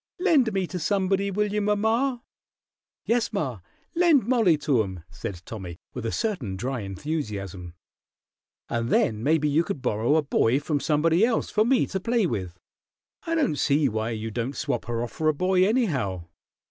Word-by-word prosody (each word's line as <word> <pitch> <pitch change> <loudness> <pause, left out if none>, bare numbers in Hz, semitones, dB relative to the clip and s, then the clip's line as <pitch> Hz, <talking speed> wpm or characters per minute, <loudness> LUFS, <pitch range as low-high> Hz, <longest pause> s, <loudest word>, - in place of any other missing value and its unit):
"Lend 310 - +3
me 195 -2 0
to 180 +1 -5
somebody, 195 +2 +1
will 210 +1 -1
you, 210 - +1
mamma?" 225 +5 +1 0.8
"Yes, 235 0 +1
ma, 140 - -2 0.3
lend 330 - +4
Mollie 225 -10 +3
to 140 -5 +2
'em," 95 -5 -5
said 90 -1 -6
Tommy, 90 -6 -7 0.2
with, 120 -2 -4
a - - -2
certain 150 - -2
dry 125 +5 -3
enthusiasm, 100 - -5 0.9
"and 115 0 -2
then 110 -1 +2
maybe 150 +3 +2
you 150 +3 +3
can 200 -1 -3
borrow 120 +2 +1
a 160 - +3
boy 135 -2 +2
from 145 0 -1
somebody 160 +5 +2
else 235 0 +1
for 215 - +3
me 265 0 +3
to 190 - -3
play 230 +2 +1
with. 90 - -3 0.7
I 330 - 0
don't 280 - +1
see 145 0 +2
why 110 -1 -2
you 110 -1 -4
don't 120 +5 -3
swap - - -2
her 120 0 -2
off 120 - -5
for 155 - -2
a 155 - +1
boy, 185 +3 +3
anyhow. 135 - 0
155 Hz, 175 wpm, -25 LUFS, -, 0.9 s, lend